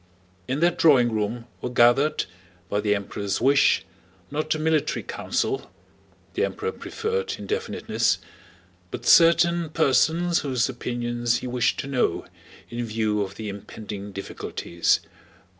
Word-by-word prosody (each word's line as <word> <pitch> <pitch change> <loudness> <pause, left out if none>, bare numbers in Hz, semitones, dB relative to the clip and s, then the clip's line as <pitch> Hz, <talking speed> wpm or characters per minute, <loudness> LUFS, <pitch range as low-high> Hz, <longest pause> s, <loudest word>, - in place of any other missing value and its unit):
In 135 +4 -2
that 175 0 +2
drawing 130 -7 +5
room 110 +2 -2 0.2
were 125 - -3
gathered, 125 +5 +3 0.4
by 105 - 0
the 105 -1 +2
Emperor's 100 0 -3
wish, 135 +3 +4 0.5
not 155 +2 -1
a - - -2
military 155 0 0
council 405 -1 -2 0.6
(the - - 0
Emperor 450 +1 -2
preferred 460 0 -3
indefiniteness), 455 +2 -1 0.7
but - - -7
certain 170 0 +5
persons 160 +3 +2
whose 130 -4 0
opinions 120 -2 -1
he - - -7
wished 125 -1 0
to - - -8
know 140 -3 0 0.5
in 120 +1 -3
view 110 -2 0
of 100 0 -4
the 110 +1 -6
impending 100 0 -7
difficulties. 90 -3 -1
125 Hz, 125 wpm, -25 LUFS, 110-160 Hz, 0.7 s, drawing